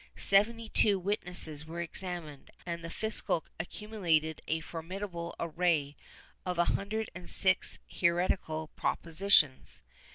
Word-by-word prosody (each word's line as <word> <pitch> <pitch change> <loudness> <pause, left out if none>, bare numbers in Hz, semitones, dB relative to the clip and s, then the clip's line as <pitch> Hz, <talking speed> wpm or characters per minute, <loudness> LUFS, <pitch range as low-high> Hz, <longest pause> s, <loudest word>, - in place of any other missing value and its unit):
Seventy 225 +3 +3
two 210 -2 +3
witnesses 175 -5 -1
were 165 +2 -6
examined, 170 -4 -3 0.2
and 170 -1 -4
the 165 - -5
fiscal 220 -5 0
accumulated 165 -4 -1
a 160 - 0
formidable 170 +2 -6
array 165 -4 0 0.5
of 180 -1 -3
a 175 - +4
hundred 215 +4 -2
and 175 0 -4
sixty 190 -1 +5
six - - -29 0.2
heretical 170 -3 +1
propositions. 165 -5 +2
175 Hz, 120 wpm, -31 LUFS, 160-195 Hz, 0.5 s, sixty